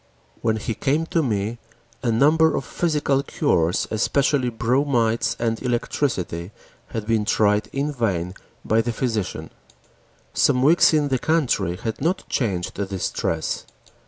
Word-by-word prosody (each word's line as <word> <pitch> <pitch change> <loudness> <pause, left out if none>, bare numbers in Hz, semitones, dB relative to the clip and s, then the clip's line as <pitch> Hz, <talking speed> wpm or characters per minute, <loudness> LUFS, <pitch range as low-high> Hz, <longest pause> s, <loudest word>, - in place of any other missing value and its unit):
When 110 -1 +1
he 110 +1 -3
came 145 +8 0
to 165 - +2
me, 110 -3 -1 0.4
a 120 - 0
number 155 +7 +4
of 135 - -2
physical 150 -5 0
cures, 90 - +1
especially 135 +3 +1
bromides 115 -1 +1
and 115 -1 -1
electricity, 115 - -2 0.4
had 110 -2 -5
been 110 -1 +1
tried 105 -1 +2
in 140 +2 -1
vain 95 -8 -1 0.3
by 110 +1 +3
the 120 +1 -2
physician. 110 -5 -3 0.8
Some 125 0 +3
weeks 160 +5 +6
in 150 -2 +2
the 130 -2 +1
country 125 - +1
had 110 +5 -5
not 175 +6 -1
changed 95 -8 -2
the 100 -1 -2
distress. 90 -4 -2
115 Hz, 135 wpm, -23 LUFS, 105-140 Hz, 0.8 s, weeks